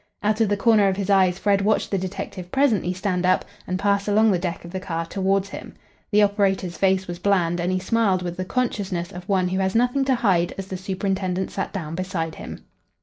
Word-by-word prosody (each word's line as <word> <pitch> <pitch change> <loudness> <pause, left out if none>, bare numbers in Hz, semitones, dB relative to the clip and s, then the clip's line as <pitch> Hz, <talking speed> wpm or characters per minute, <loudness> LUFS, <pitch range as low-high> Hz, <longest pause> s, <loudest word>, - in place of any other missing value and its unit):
Out 215 +2 +1
of 220 - +3
the 205 - +1
corner 215 -1 +4
of 190 -1 0
his 200 0 -1
eyes, 185 -2 +4
Fred 200 0 +2
watched 210 +2 +1
the 195 - +1
detective 185 -1 -6
presently 235 -10 +2
stand 185 -1 -1
up 185 0 +2 0.2
and 185 - -1
pass 200 +1 +1
along 215 +1 +4
the 180 - +1
deck 175 -1 -4
of 170 - -9
the 190 - -3
car 165 -3 -3
towards 195 +2 0
him. - - -9 0.3
The 210 -1 +4
operator's 195 -3 +1
face 190 -1 +2
was 175 0 -6
bland, 180 -3 +1
and 175 +2 0
he 185 - +1
smiled 190 -1 +1
with 175 -1 -4
the 185 - -3
consciousness 190 -6 -2
of 180 +2 -10
one 185 -2 +2
who 190 +1 -1
has 190 +1 0
nothing 245 +4 +2
to 265 -1 +3
hide 190 -8 +1
as 195 0 -6
the 190 - -4
superintendent 190 0 -2
sat 195 - -3
down 165 -6 -5
beside 170 -2 -3
him. - - -9
190 Hz, 225 wpm, -23 LUFS, 180-205 Hz, 0.3 s, corner